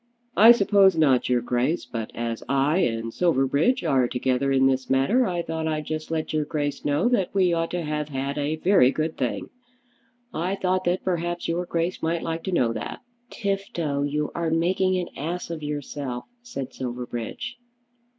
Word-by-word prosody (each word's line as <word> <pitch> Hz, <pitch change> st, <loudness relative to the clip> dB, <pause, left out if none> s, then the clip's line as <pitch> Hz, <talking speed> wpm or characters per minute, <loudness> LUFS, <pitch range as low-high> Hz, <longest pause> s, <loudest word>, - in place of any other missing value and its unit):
"I 225 Hz, +4 st, +9 dB
suppose 200 Hz, -5 st, +5 dB
not, 135 Hz, -6 st, +3 dB
your 125 Hz, -1 st, +3 dB
Grace. 125 Hz, +7 st, 0 dB
But 115 Hz, -2 st, -5 dB
as 115 Hz, -1 st, -3 dB
I 140 Hz, +4 st, +2 dB
and 115 Hz, -6 st, -1 dB
Silverbridge 165 Hz, -, +2 dB
are 130 Hz, -2 st, +3 dB
together 130 Hz, +2 st, 0 dB
in 135 Hz, 0 st, +4 dB
this 130 Hz, -1 st, +1 dB
matter 170 Hz, -, +3 dB
I 175 Hz, -2 st, -1 dB
thought 160 Hz, -1 st, -3 dB
I'd 155 Hz, -1 st, -2 dB
just 155 Hz, 0 st, -4 dB
let 160 Hz, -1 st, -2 dB
your 155 Hz, -1 st, +1 dB
Grace 145 Hz, -1 st, -3 dB
know 145 Hz, +9 st, +1 dB
that 210 Hz, -8 st, +1 dB
we 185 Hz, -3 st, +3 dB
ought 165 Hz, 0 st, 0 dB
to 175 Hz, -1 st, -3 dB
have 150 Hz, -1 st, -3 dB
had 140 Hz, 0 st, -3 dB
a 145 Hz, +2 st, 0 dB
very 175 Hz, -5 st, +4 dB
good 155 Hz, +3 st, -2 dB
thing. 125 Hz, -3 st, -3 dB, 0.8 s
I 180 Hz, +4 st, -1 dB
thought 185 Hz, -1 st, 0 dB
that 175 Hz, +1 st, 0 dB
perhaps 175 Hz, -1 st, -2 dB
your 175 Hz, +1 st, -1 dB
Grace 170 Hz, +2 st, -1 dB
might 165 Hz, +1 st, -1 dB
like 165 Hz, 0 st, -3 dB
to 190 Hz, -, -2 dB
know 125 Hz, -10 st, +2 dB
that." 110 Hz, -, -6 dB, 0.3 s
"Tifto, 195 Hz, -8 st, -2 dB
you 150 Hz, +1 st, -1 dB
are 170 Hz, -1 st, -1 dB
making 185 Hz, +3 st, +2 dB
an 180 Hz, -1 st, -3 dB
ass 170 Hz, +4 st, -4 dB
of 165 Hz, -2 st, -5 dB
yourself," 145 Hz, -4 st, -4 dB, 0.2 s
said 140 Hz, -, -6 dB
Silverbridge. 125 Hz, -, -5 dB
155 Hz, 180 wpm, -25 LUFS, 135-175 Hz, 0.8 s, I